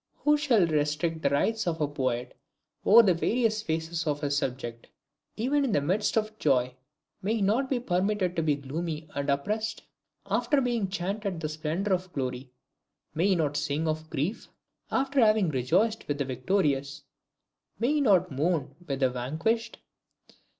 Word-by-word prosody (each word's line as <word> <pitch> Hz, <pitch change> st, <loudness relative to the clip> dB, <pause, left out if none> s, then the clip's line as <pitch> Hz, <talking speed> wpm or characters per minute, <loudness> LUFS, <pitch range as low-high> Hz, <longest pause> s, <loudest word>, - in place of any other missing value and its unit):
Who 295 Hz, 0 st, +5 dB
shall 260 Hz, -, +3 dB
restrict 155 Hz, +1 st, 0 dB
the 140 Hz, -, +2 dB
rights 210 Hz, +9 st, 0 dB
of 165 Hz, -2 st, -1 dB
a 150 Hz, -, +1 dB
poet 130 Hz, -4 st, -2 dB, 0.5 s
over 230 Hz, +3 st, +8 dB
the 190 Hz, -4 st, +4 dB
various 220 Hz, +5 st, +1 dB
phases 160 Hz, -2 st, -2 dB
of 145 Hz, -1 st, -1 dB
his 145 Hz, -1 st, 0 dB
subject? 125 Hz, -4 st, -3 dB, 0.5 s
Even 280 Hz, +6 st, +1 dB
in 255 Hz, -6 st, 0 dB
the -, -, +4 dB
midst 200 Hz, +9 st, 0 dB
of 215 Hz, 0 st, -1 dB
joy, 125 Hz, -3 st, +2 dB, 0.5 s
may 210 Hz, +4 st, 0 dB
he 220 Hz, -, -2 dB
not 235 Hz, +7 st, +1 dB
be 260 Hz, -, +1 dB
permitted 190 Hz, -3 st, 0 dB
to 165 Hz, -, +1 dB
be 155 Hz, -2 st, +2 dB
gloomy 155 Hz, +3 st, -5 dB
and 140 Hz, 0 st, -2 dB
oppressed? 215 Hz, +10 st, -1 dB, 0.4 s
After 290 Hz, -, +1 dB
having 240 Hz, -7 st, 0 dB
chanted 195 Hz, 0 st, -3 dB
the 155 Hz, -1 st, -3 dB
splendor 160 Hz, +6 st, -1 dB
of 185 Hz, 0 st, -2 dB
glory, 130 Hz, -1 st, -3 dB, 0.6 s
may 165 Hz, +5 st, +1 dB
he 195 Hz, -, +3 dB
not 150 Hz, -4 st, 0 dB
sing 150 Hz, +2 st, -1 dB
of 155 Hz, 0 st, -3 dB
grief? 160 Hz, +11 st, -2 dB, 0.4 s
After 270 Hz, +1 st, +1 dB
having 215 Hz, -5 st, +4 dB
rejoiced 175 Hz, -, +1 dB
with 145 Hz, -, -1 dB
the 140 Hz, -, -1 dB
victorious, 140 Hz, -1 st, -1 dB, 0.7 s
may 235 Hz, +6 st, +1 dB
he 300 Hz, -, +2 dB
not 185 Hz, -, +3 dB
mourn 145 Hz, 0 st, 0 dB
with 135 Hz, -1 st, -3 dB
the 130 Hz, -, +4 dB
vanquished? 165 Hz, -, -2 dB
170 Hz, 165 wpm, -28 LUFS, 145-215 Hz, 0.7 s, over